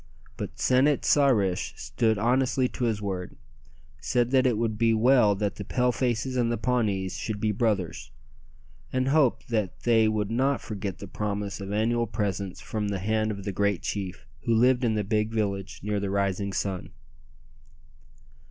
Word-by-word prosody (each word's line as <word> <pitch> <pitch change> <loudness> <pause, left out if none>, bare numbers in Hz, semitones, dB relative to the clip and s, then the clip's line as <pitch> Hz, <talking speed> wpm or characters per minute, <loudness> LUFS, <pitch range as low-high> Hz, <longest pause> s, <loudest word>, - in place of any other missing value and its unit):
But - - -6
San 130 +2 +4
it 145 -2 +1
sa 145 -1 +5
rish 100 -8 +1
stood 110 -3 0
honestly 125 +3 +2
to 125 - -3
his 110 -3 -1
word, 95 -3 -4 0.6
said 120 - 0
that 130 -1 +4
it 120 -4 +1
would 110 -1 0
be 115 +1 +3
well 115 -2 +4
that 100 0 -2
the 100 - -5
Pale 125 +5 +1
faces 125 +1 -1
and 120 -1 +1
the 120 - 0
Pawnees 105 -5 0
should 110 -2 -4
be 110 0 +1
brothers, 105 -5 -1 0.8
and 130 0 0
hoped 140 -5 +2
that 110 -6 -2
they 115 -2 +4
would 105 -1 -1
not 135 +3 +1
forget 100 -4 -5
the 100 - -8
promise 100 0 -3
of 100 0 -5
annual 115 +3 +1
presents 100 -3 -3
from 105 -1 -3
the 100 -1 -1
hand 110 +3 0
of 100 -2 -5
the 100 - -3
great 100 -1 0
chief 95 -6 -4 0.2
who 115 - +3
lived 125 +2 +4
in 115 -2 +2
the 105 - 0
big 105 +2 0
village 100 -3 -2
near 105 0 -1
the 100 -1 -2
rising 100 0 0
sun. 95 -2 -3
110 Hz, 180 wpm, -27 LUFS, 100-120 Hz, 0.8 s, sa